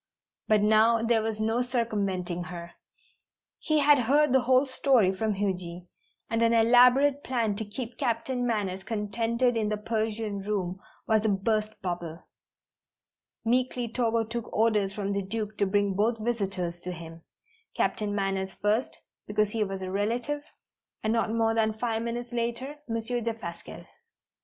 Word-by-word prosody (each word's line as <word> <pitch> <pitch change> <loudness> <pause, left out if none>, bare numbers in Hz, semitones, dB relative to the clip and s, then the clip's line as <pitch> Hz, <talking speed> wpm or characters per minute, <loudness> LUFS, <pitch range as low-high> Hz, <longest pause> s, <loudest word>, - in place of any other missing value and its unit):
But 215 -1 +4
now 220 +2 +4
there 230 -1 +3
was 220 -1 -3
no 225 +2 +1
circumventing 200 -8 -1
her. 170 +1 -8 0.9
He 310 - +1
had 290 0 +6
heard 280 +3 +3
the 265 - +6
whole 255 +2 +4
story 260 -7 +3
from 215 +2 -1
Huji, 180 -3 -3 0.4
and 225 0 0
an 230 0 +4
elaborate 250 +5 +5
plan 230 -5 0
to 220 - -3
keep 230 +3 -7
Captain 245 +2 -1
Manners 200 -5 -1
contented 230 +4 0
in 215 -2 0
the 210 - -1
Persian 215 -1 -2
room 195 -3 -2 0.3
was 220 -1 +2
a 220 - +2
burst 215 +2 0
bubble. 175 -2 -4 1.2
Meekly 250 +1 +1
Togo 230 -1 +1
took 230 +1 -5
orders 215 -3 +2
from 200 0 -3
the 200 - 0
Duke 210 +2 -4
to 200 - +3
bring 200 0 +1
both 220 +4 +1
visitors 195 -7 -2
to 180 +1 -6
him, 165 -1 -10 0.5
Captain 205 -1 0
Manners 195 -1 -1
first, 215 +5 0 0.3
because 210 0 +1
he 220 -1 0
was 195 -1 -4
a 185 - -4
relative, 235 +9 -1 0.6
and 220 +1 +1
not 225 -1 +1
more 225 0 +2
than 220 -1 +2
five 225 -1 -1
minutes 240 +1 -4
later, 240 +5 -3
Monsieur 230 +2 -2
Defasquelle. 220 -7 -6
220 Hz, 150 wpm, -28 LUFS, 200-235 Hz, 1.2 s, had